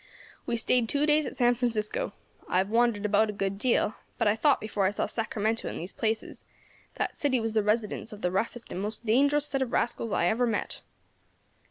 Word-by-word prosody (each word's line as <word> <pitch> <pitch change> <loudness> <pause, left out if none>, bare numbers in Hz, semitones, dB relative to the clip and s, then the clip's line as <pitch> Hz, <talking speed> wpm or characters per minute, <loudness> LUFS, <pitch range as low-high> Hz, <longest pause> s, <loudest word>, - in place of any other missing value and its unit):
We 235 - 0
stayed 235 0 +1
two 285 +1 +1
days 300 -1 +3
at - - -6
San 245 0 +4
Francisco. 225 -4 0 0.4
I - - +1
have 190 +2 +1
wandered 230 -3 +2
about 210 +1 +3
a - - -3
good 195 0 -2
deal, 235 -2 +2 0.2
but 230 - +1
I 205 - +4
thought 275 +5 +3
before 215 -2 -1
I - - +3
saw 205 - -1
Sacramento 220 0 -1
and - - -6
these 175 +4 -6
places, 220 0 -2 0.5
that - - -2
city 265 -4 +1
was 225 -1 -2
the 220 - +3
residence 210 +1 -1
of 210 -1 -10
the 180 - +1
roughest 230 +5 -2
and 185 - -4
most 215 +3 -5
dangerous 285 +6 +3
set 270 -2 -2
of 255 -3 -1
rascals 230 -1 -1
I 170 - +1
ever 235 +7 +2
met. 220 -3 -2
225 Hz, 210 wpm, -28 LUFS, 210-245 Hz, 0.5 s, San